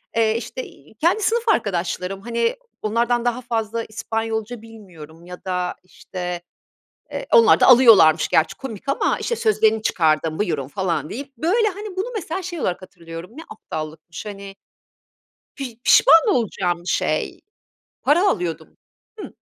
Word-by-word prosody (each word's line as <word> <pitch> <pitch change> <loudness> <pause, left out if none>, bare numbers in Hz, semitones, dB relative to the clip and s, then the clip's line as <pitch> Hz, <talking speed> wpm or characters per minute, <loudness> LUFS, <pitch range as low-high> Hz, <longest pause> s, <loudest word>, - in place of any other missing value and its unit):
eee, 225 0 +2
işte, 235 +2 -6
iii, 150 +9 -16
kendi 345 - +1
sınıf 460 +3 +1
arkadaşlarım 190 - -1
hani 235 +1 -1 0.3
onlardan 235 +2 0
daha 245 +1 0
fazla 230 -1 -2
İspanyolca 225 +1 -4
bilmiyorum 175 -8 -13
ya 180 0 -11
da 180 -1 -2
işte, 180 -1 -6 0.7
eee, - - -5
onlar 465 -2 +6
da - - +6
alıyorlarmış 225 -11 +7
gerçi 160 - +2
komik 255 -2 -8
ama 275 - +1
işte 470 - -2
sözlerini 220 - +2
çıkardım 160 -4 +1
buyurun 155 -10 -2
falan 180 -3 -2
deyip 275 +2 -8
böyle 430 +7 +2
hani 410 0 -7
bunu 385 +5 -1
mesela 370 -2 -4
şey 345 -2 -6
olarak 180 -5 -2
hatırlıyorum 170 0 -10
ne 320 - -9
aptallıkmış 155 +4 -8
hani 200 -1 -8 1.0
pij 260 -5 -6
pişman 330 +7 +6
olacağım 185 - 0
bir 175 - -9
şey. - - -1 0.6
Para 340 +8 +3
alıyordum. 165 - -2 0.5
Hı - - -9
220 Hz, 140 wpm, -21 LUFS, 180-270 Hz, 1.0 s, alıyorlarmış